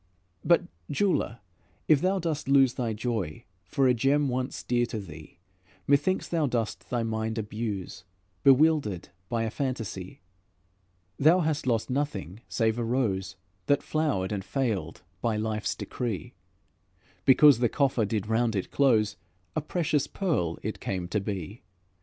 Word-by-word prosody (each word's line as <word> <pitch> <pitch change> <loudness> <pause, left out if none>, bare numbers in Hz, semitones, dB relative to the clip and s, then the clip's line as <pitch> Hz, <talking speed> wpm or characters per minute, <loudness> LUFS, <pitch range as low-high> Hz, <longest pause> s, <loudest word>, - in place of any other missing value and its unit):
"But, 175 0 +4 0.3
Jeweler, 150 - 0 0.5
if 150 -3 +5
thou 190 +2 +2
dost 165 -6 -2
lose 135 -2 +5
Thy 120 -3 -2
joy 110 -7 -3 0.2
for 135 +7 +2
a 125 - +5
gem 135 +4 +2
once 125 +1 -3
dear 120 0 +1
to 110 - -4
thee, 80 -4 -11 0.5
Methinks 145 +7 +2
thou 160 -4 +1
dost 115 -4 -3
thy 120 -2 0
mind 110 0 -2
abuse, 105 -4 -4 0.4
Bewildered 135 - +4 0.2
by 115 -1 0
a 110 - -2
fantasy; 115 -9 -4 1.0
Thou 165 +6 +5
hast 155 -4 -1
lost 115 0 +1
nothing 125 - -2
save 115 0 +1
a - - 0
rose 105 -7 -1 0.3
That 145 0 +3
flowered 145 -12 0
and 100 -2 -2
failed 105 - -2 0.2
by 115 -2 +1
life's 110 0 -1
decree: 120 -1 -4 0.9
Because 140 -1 +7
the 120 -2 +3
coffer 135 -5 +1
did 105 -1 -1
round 110 +1 +1
it 95 - -3
close, 115 -7 +3 0.4
A 155 - +1
precious 155 -2 0
pearl 145 - -1
it - - -4
came 90 -2 -3
to 105 - 0
be. 100 +1 -5
120 Hz, 145 wpm, -28 LUFS, 105-140 Hz, 1.0 s, Because